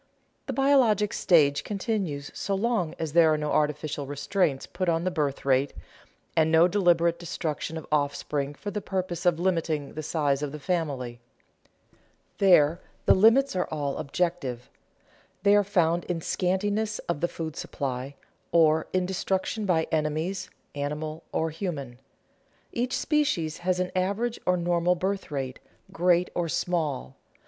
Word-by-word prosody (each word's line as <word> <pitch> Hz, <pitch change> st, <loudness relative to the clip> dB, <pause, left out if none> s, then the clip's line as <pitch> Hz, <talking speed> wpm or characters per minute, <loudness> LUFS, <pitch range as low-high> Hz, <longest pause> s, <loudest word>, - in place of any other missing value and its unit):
_ -, -, -38 dB, 0.4 s
The -, -, -2 dB
biologic 255 Hz, -7 st, +3 dB
stage 145 Hz, -5 st, +3 dB
continues 195 Hz, -9 st, -3 dB
so 195 Hz, -, -2 dB
long 205 Hz, -6 st, 0 dB
as 160 Hz, -3 st, -4 dB
there 165 Hz, -2 st, +6 dB
are 155 Hz, -, +2 dB
no 150 Hz, 0 st, -2 dB
artificial 150 Hz, -1 st, 0 dB
restraints 145 Hz, 0 st, 0 dB
put 185 Hz, -1 st, -2 dB
on 165 Hz, 0 st, +1 dB
the 185 Hz, -, 0 dB
birth 145 Hz, -6 st, -2 dB
rate, 135 Hz, +1 st, +2 dB, 0.6 s
and 160 Hz, 0 st, +3 dB
no 165 Hz, +2 st, +6 dB
deliberate 170 Hz, -3 st, +2 dB
destruction 160 Hz, -1 st, -4 dB
of 160 Hz, -, -7 dB
offspring 145 Hz, -1 st, -1 dB
for 205 Hz, +7 st, -6 dB
the 210 Hz, -, -3 dB
purposes 185 Hz, -2 st, -2 dB
of 170 Hz, -2 st, +3 dB
limiting 165 Hz, -5 st, -1 dB
the 155 Hz, -, -4 dB
size 145 Hz, -3 st, 0 dB
of 145 Hz, -2 st, -3 dB
the 150 Hz, -, -6 dB
family. 140 Hz, -8 st, -2 dB, 1.2 s
There 175 Hz, -4 st, +5 dB, 0.2 s
the -, -, +7 dB
limits 230 Hz, +6 st, +5 dB
are 180 Hz, -, 0 dB
all 145 Hz, -3 st, -2 dB
objective; 155 Hz, -5 st, -2 dB, 0.7 s
they 200 Hz, 0 st, +6 dB
are 205 Hz, -, +5 dB
found 175 Hz, -4 st, +1 dB
in 175 Hz, -2 st, -2 dB
scantiness 205 Hz, +5 st, 0 dB
of 170 Hz, -4 st, -2 dB
the 175 Hz, -, +2 dB
food 160 Hz, -3 st, -6 dB
supply, 135 Hz, 0 st, -4 dB, 0.4 s
or 160 Hz, -1 st, +4 dB
in 185 Hz, -1 st, +2 dB
destruction 190 Hz, +3 st, -2 dB
by 165 Hz, -3 st, +3 dB
enemies, 160 Hz, +4 st, -1 dB, 0.2 s
animal 150 Hz, +2 st, -4 dB
or 160 Hz, 0 st, 0 dB
human. 145 Hz, -8 st, -5 dB, 0.7 s
Each 245 Hz, +2 st, -1 dB
species 290 Hz, -, 0 dB
has 180 Hz, 0 st, 0 dB
an 185 Hz, 0 st, -1 dB
average 200 Hz, +6 st, 0 dB
or 180 Hz, 0 st, +3 dB
normal 175 Hz, 0 st, +2 dB
birth 195 Hz, +2 st, -2 dB
rate, 135 Hz, -3 st, -4 dB, 0.3 s
great 180 Hz, -1 st, +2 dB
or 170 Hz, -2 st, -1 dB
small. 155 Hz, -, -2 dB
170 Hz, 150 wpm, -27 LUFS, 150-185 Hz, 1.2 s, the